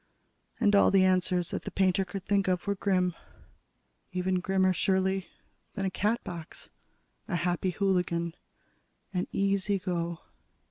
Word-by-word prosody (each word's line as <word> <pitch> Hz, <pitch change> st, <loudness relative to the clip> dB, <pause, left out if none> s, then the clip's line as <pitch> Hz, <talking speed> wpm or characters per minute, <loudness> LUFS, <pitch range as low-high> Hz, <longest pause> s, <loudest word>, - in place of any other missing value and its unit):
All 200 Hz, -, +6 dB
the 190 Hz, -1 st, +5 dB
answers 180 Hz, -1 st, +1 dB
that -, -, -2 dB
the -, -, -4 dB
painter 190 Hz, 0 st, +2 dB
could 190 Hz, +1 st, -7 dB
think 200 Hz, -1 st, +2 dB
of 180 Hz, -1 st, 0 dB
were 200 Hz, -, +1 dB
grim. 185 Hz, -2 st, +1 dB, 1.0 s
Even 185 Hz, 0 st, 0 dB
grimmer, 190 Hz, 0 st, +2 dB
surely, 190 Hz, +1 st, +1 dB, 0.5 s
than 195 Hz, -2 st, -2 dB
a 190 Hz, -, -1 dB
Catbox, 185 Hz, -6 st, -3 dB, 0.6 s
a 195 Hz, -, -1 dB
Happy 175 Hz, +1 st, 0 dB
Hooligan, 180 Hz, -3 st, 0 dB, 0.8 s
an 180 Hz, -1 st, -1 dB
Easy 200 Hz, 0 st, +1 dB
Go. 170 Hz, -3 st, -3 dB
185 Hz, 130 wpm, -29 LUFS, 180-195 Hz, 1.0 s, All